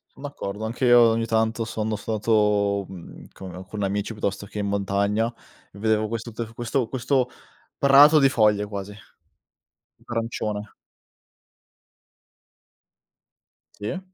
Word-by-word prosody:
Son 140 - -14
d'accordo, 110 -7 -5
anche 120 +3 -2
io 120 0 +7
ogni 115 0 +3
tanto 110 0 0
sono 110 0 -2
stato, 105 -2 +1
mhmm, 90 -3 -11
con 95 -1 -9
con 105 -1 -5
amici 100 +3 -2
piuttosto 100 -1 -3
che 105 - -10
in 100 - -1
montagna 100 +3 0 0.4
e 100 - -15
vedevo 110 0 +1
questo 115 +1 -5
t 115 0 -6
questo 120 0 -1
questo 130 0 0 0.5
prato 145 +3 +7
di 135 - +6
foglie 105 -5 +2
quasi 100 0 -7 1.1
arancione. 110 -3 -4 3.0
Sì. 105 - -4
110 Hz, 120 wpm, -24 LUFS, 100-115 Hz, 3.0 s, io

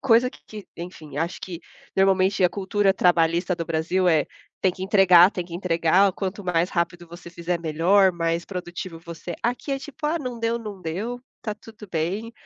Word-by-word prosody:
coisa 245 0 +4
que - - -17 0.2
que, - - -30
enfim, 155 -5 -8
acho 170 +3 -2
que 175 -3 -7 0.3
normalmente 190 0 +3
a 180 - +6
cultura 200 +1 +1
trabalhista 175 0 +2
do 165 -1 -5
Brasil 170 +3 +1
é: 155 -4 +4 0.4
tem 185 - +3
que 185 - -9
entregar, 190 -2 +6
tem 180 -4 -4
que 170 -1 -10
entregar, 180 +2 +3
quanto 195 +2 -4
mais 180 -1 +1
rápido 175 0 -2
você 170 +1 -11
fizer, 170 0 -3
melhor, 175 +5 +4
mais 170 -1 -2
produtivo 180 -2 -6
você 170 +1 -8
é. - - -5
Aqui 245 +4 -1
é 270 - -1
tipo: 290 +2 -6
"Ah, 320 +3 0
não 250 -5 -5
deu, 230 +1 0
não 210 -4 -8
deu. 205 +9 -4 0.2
Tá 215 - -3
tudo 220 0 -13
bem, 185 +8 -2
180 Hz, 195 wpm, -24 LUFS, 170-205 Hz, 0.4 s, a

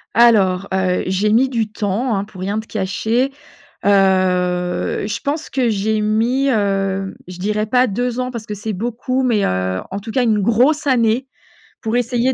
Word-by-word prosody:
Alors, 200 -5 +4
heu, 185 -1 +1
j'ai 195 +3 +1
mis 260 +4 +4
du 225 -4 -1
temps, 215 +3 -1
hein, 195 - -1
pour 200 -3 -11
rien 200 +3 -1
te 220 - -8
cacher. 220 +6 -1 0.5
Heu, 185 -3 +2
je 205 - -3
pense 295 +3 -3
que 255 -3 +1
j'ai 215 +1 0
mis, 230 +6 +1
heu, 195 -4 0
je 180 -1 -9
dirais 210 +3 -1
pas 250 +3 +3
2 245 +3 -2
ans 250 0 -2
parce 235 -3 -7
que 210 - -4
c'est 210 +2 -4
beaucoup 240 +5 -2
mais, 230 -5 +2
heu, 95 0 -1
en 195 - -3
tout 220 +3 -8
cas 255 - +2
une 220 -3 +2
grosse 250 +9 +2
année 245 -1 +2 0.6
pour 220 +1 -2
essayer 245 +1 +1
215 Hz, 180 wpm, -19 LUFS, 195-245 Hz, 0.6 s, Alors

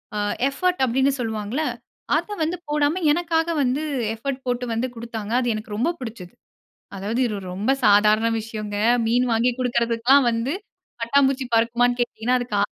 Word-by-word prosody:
அ - - -1 0.3
effort 360 +2 -1
அப்டின்னு 265 +3 +2
சொல்லுவாங்கல்ல! 220 +4 -2 0.5
அத - - -3
வந்து 340 +3 -1
போடாம, 300 +4 +1
எனக்காக 330 0 +1
வந்து 270 +3 0 0.3
எஃபர்ட் 265 +3 -4
போட்டு 245 0 -1
வந்து 235 +3 -1
குடுத்தாங்க. 225 -2 -6
அது 245 - -1
எனக்கு 215 -1 -6
ரொம்ப 250 +10 +1
பிடிச்சது. 220 -8 -8 0.6
அதாவது 205 +5 -3
இது 220 -3 -2
ஒரு 190 - -9
ரொம்ப 210 +8 0
சாதாரண 210 +2 +5
விஷயங்க. 215 -2 -6 0.3
மீன் 245 +2 +2
வாங்கி 235 +2 +2
குடுக்கறதுக்குலாம் 240 +2 +3
வந்து, 230 +6 -1 0.5
பட்டாம்பூச்சி 270 +2 +2
பறக்குமான்னு 240 +2 +2
கேட்டீங்கன்னா, 240 +1 0
அதுக்கு 240 -4 -3
ஆ - - +4
240 Hz, 150 wpm, -23 LUFS, 220-270 Hz, 0.6 s, சாதாரண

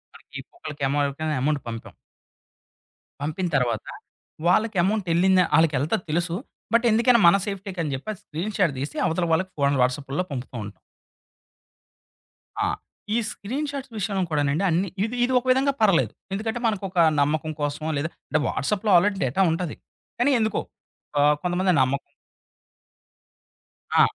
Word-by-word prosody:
మనకి - - -10
ఒక్కొక్కలకేమో 145 - -3
ఎవరికైనా 150 +2 -2
అమౌంట్ 145 +1 +1
పంపాం. 115 -1 -7 1.3
పంపిన 160 +5 -2
తర్వాత 120 -4 -1 0.6
వాళ్ళకి 215 +3 +2
అమౌంట్ 200 0 0
ఎళ్ళిందా? 185 +2 +4
ఆళ్ళకెళ్తది 160 +1 +2
తెలుసు. 170 +1 0 0.4
బట్ 230 +1 +4
ఎందుకైనా 235 +2 +5
మన 170 - +7
సేఫ్టీకని 190 -6 -4
జెప్పి 135 +10 -7
అది 200 - -15
స్క్రీన్‌షాట్ 180 0 -1
దీసి 140 +3 -4
అవతల 170 +1 0
వాళ్ళకి 185 +3 0
ఫోన్ 140 0 +3
వాట్సాప్పుల్లో 135 +5 0
పంపుతూ 130 -1 -6
ఉంటాం. 100 0 -11 1.9
ఆ! - - +1 0.5
ఈ - - +3
స్క్రీన్‌షాట్స్ 275 +5 -4
విషయంలో 195 -1 -1
కూడానండి 145 +3 +1
అన్ని 180 +3 +1
ఇది 225 +3 -2
ఇది 255 +1 +1
ఒక 245 - -15
విధంగా 270 +2 +3
పర్లెదు. 195 -6 +3 0.2
ఎందుకంటే 220 +4 -2
మనకొక 195 -4 -1 0.2
నమ్మకం 155 +2 0
కోసమో 145 +2 -2
లేదా 150 +3 -1 0.2
అంటే 155 - +1
వాట్సాప్‌లో 205 +8 0
ఆల్రెడీ 195 +3 +2
డేటా 130 +9 0
ఉంటది. 165 -1 -2 0.4
కానీ 260 +4 +3
ఎందుకో 220 -1 0 0.6
ఆహ్, 150 +1 +5
కొంతమంది 180 +1 +1
నమ్మకం. 135 +2 -1 1.9
ఆ! - - +9
175 Hz, 130 wpm, -24 LUFS, 145-205 Hz, 1.9 s, ఆ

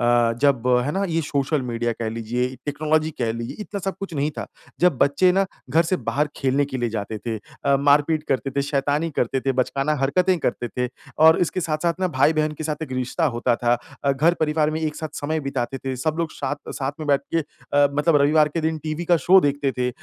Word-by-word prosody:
अ, 120 -1 +3
जब 140 -4 +2 0.2
है 145 - -1
ना 195 - -1
ये 165 -1 0
सोशल 140 0 -1
मीडिया 120 -1 -2
कह 115 0 -4
लीजिए, 115 +2 -2 0.2
टेक्नोलॉजी 155 +2 0
कह 115 -2 0
लीजिए, 115 0 -6
इतना 205 -1 -5
सब 195 -1 -3
कुछ 195 -4 -6
नहीं 145 +1 0
था। - - -4 0.3
जब 175 -6 +4
बच्चे 145 +6 +4
ना 195 +1 +3 0.3
घर 160 +5 +4
से 175 +2 0
बाहर 150 -2 -1
खेलने 135 +1 +1
के 140 -1 -5
लिए 120 -1 0
जाते 110 0 -4
थे, 115 0 -4 0.3
अ, 140 -1 +4
मारपीट 145 +2 +3
करते 135 0 0
थे, 140 +1 -1
शैतानी 145 +3 0
करते 130 +2 0
थे, 135 +1 0
बचकाना 135 +4 0
हरकतें 180 +7 +2
करते 120 0 -2
थे 125 +1 -2 0.4
और 160 - +7
इसके 180 +1 0
साथ-साथ 165 +2 -1
ना 185 - +1
भाई-बहन 155 +2 +3
के 155 - -4
साथ 150 0 -3
एक 145 -5 -6
रिश्ता 130 +6 -1
होता 120 0 +2
था। 120 0 +2 0.3
अ, 140 - +3
घर-परिवार 155 +1 +2
में 155 +1 -3
एक 155 -1 -2
साथ 155 -1 -6
समय 155 +2 -1
बिताते 135 -2 -3
थे, 135 0 -4
सब 155 +5 -1
लोग 165 -1 -1
शाथ 145 +1 -5
साथ 135 +1 -1
में 155 - -4
बैठ 140 -1 +4
के - - +4
अ, 145 -1 0
मतलब 150 +2 +3
रविवार 150 +1 +4
के 165 +2 -3
दिन 160 0 -1
टीवी 155 +2 -3
का - - +7
शो 190 +1 +8
देखते 145 -3 0
थे, 125 0 +1
145 Hz, 225 wpm, -23 LUFS, 130-160 Hz, 0.4 s, शो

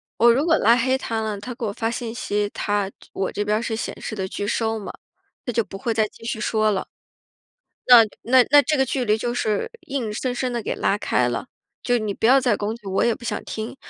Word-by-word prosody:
我 235 +1 +6
如 275 +6 +1
果 325 -1 +4
拉 230 - +5
黑 260 +2 +2
他 225 -3 -3
了， 215 -2 -2
他 205 +5 -7
给 235 -1 -5
我 205 - -2
发 225 +1 -2
信 235 -1 -5
息， 205 -3 -1
他 205 -2 -1 0.2
我 190 - -2
这 205 - -2
边 210 +1 0
是 235 -1 -2
显 220 - -5
示 220 - -5
的 190 -2 -3
拒 205 +2 -4
收 225 +1 0
嘛， 205 - -7 0.6
他 245 - -2
就 230 - +1
不 195 - -9
会 230 +4 -2
再 220 -1 +2
继 210 - -18
续 230 -1 -3
说 215 0 +1
了。 195 - -2 1.0
那 245 -2 +10 0.2
那 255 +2 +5
那 290 0 +8
这 305 - 0
个 265 -2 +2
距 260 0 -1
离 215 -1 +2
就 240 +2 -2
是 215 -4 -1
硬 270 -9 -3
生 245 +4 -2
生 255 +1 -2
地 240 -1 -3
给 - - -2
拉 200 - +1
开 125 -11 +1
了， 120 - -3 0.4
就 245 -1 +2
你 215 -3 -3
不 - - -7
要 260 +4 +6
再 245 -5 +2
攻 210 +2 -3
击， 230 -3 -14
我 190 0 +1
也 235 - +2
不 - - -16
想 240 - -3
听。 220 +4 -6
225 Hz, 270 characters per minute, -23 LUFS, 210-245 Hz, 1.0 s, 那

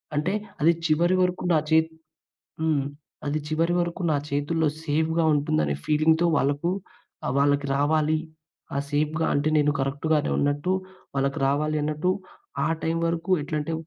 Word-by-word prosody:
అంటే 155 +6 0 0.3
అది 165 - +6
చివరి 170 +3 +3
వరకు 180 0 0
నా - - +5
చే 160 - +5 0.8
హ్మ్. 155 -3 +1 0.4
అది 145 +2 0
చివరి 165 +2 +1
వరకు 175 +1 -2
నా 150 - +3
చేతుల్లో 150 +3 +1 0.2
సేఫ్‌గా 160 +2 +1
ఉంటుందనే 75 - +1
ఫీలింగ్‌తో 160 +2 +3
వాళ్ళకు 145 +5 +1 0.6
ఆహ్, 125 - -1
వాళ్ళకి 145 0 +2
రావాలి. 155 +2 +2 0.6
ఆ - - +1
సేఫ్‌గా 155 +2 0
అంటే 145 +2 +1
నేను 150 0 +3
కరెక్టు‌గానే 145 +3 0
ఉన్నట్టు, 145 +5 +1 0.4
వాళ్ళకి 135 +2 0
రావాలి 150 +2 +1
అన్నట్టు, 150 +4 0 0.6
ఆ - - +1
టైమ్ 165 +1 0
వరకు 165 +2 -2
ఎట్లంటే, 150 +2 -3
155 Hz, 140 wpm, -25 LUFS, 145-165 Hz, 0.8 s, అది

